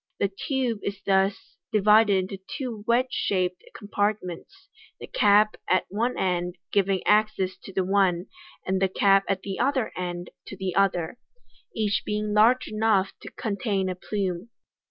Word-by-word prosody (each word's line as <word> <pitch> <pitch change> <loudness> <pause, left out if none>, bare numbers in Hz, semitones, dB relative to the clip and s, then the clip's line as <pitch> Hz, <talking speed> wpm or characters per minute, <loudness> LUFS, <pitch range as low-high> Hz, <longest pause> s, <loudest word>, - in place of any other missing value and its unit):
The 200 - +1 0.2
tube 255 -5 0
is 200 -1 -4
thus 195 +2 0
divided 210 0 +5 0.2
into 195 - -5 0.2
two 240 -7 -5
wedge 250 +2 +2
shaped 185 -5 -1 0.2
compart 205 0 0
ments, 180 +10 -10 0.3
the - - -7
cap 215 - +3
at 185 - +3
one 230 +6 -1
end 180 -1 -1 0.2
giving 195 -2 +1
access 210 -3 +2
to - - -8
the 190 0 0
one, 185 -2 +2 0.4
and 190 0 0
the 190 - +3
cap 195 +1 +3
at 195 -1 0
the 195 -1 -5
other 260 -2 +1
end 175 -1 -5 0.2
to 200 - -8
the 190 -1 -3
other 195 +1 +1 0.6
3 220 - -2
each 205 -1 +1
being 210 0 -2
large 230 +5 +4
enough 215 -3 +1
to - - -9
contain 200 -3 -2
a 185 - -3
plume. 190 +1 -3
200 Hz, 160 wpm, -26 LUFS, 190-215 Hz, 0.6 s, divided